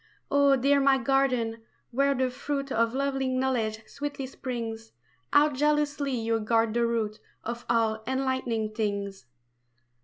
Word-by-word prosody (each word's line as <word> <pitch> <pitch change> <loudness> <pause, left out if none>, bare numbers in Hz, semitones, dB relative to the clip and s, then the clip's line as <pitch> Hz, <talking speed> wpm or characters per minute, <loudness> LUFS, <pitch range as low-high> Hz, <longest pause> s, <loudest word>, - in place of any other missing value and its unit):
Oh, 280 -1 +5
dear 280 +2 +3
my 275 -1 +4
garden, 250 -3 +1 0.3
where 275 +3 +2
the 260 0 0
fruit 275 +1 -3
Of 230 +1 +1
lovely 270 -1 0
knowledge 250 -4 -1
sweetly 285 +2 -5
springs, 230 -4 -6 0.4
How 295 +1 +6
jealously 295 0 +1
you 225 -1 0
guard 225 0 +1
the 235 0 +2
root 220 -2 -1 0.2
Of 235 +1 -5
all 225 -2 +2
enlightening 260 -5 -1
things! 200 - -3
250 Hz, 130 wpm, -27 LUFS, 225-275 Hz, 0.4 s, How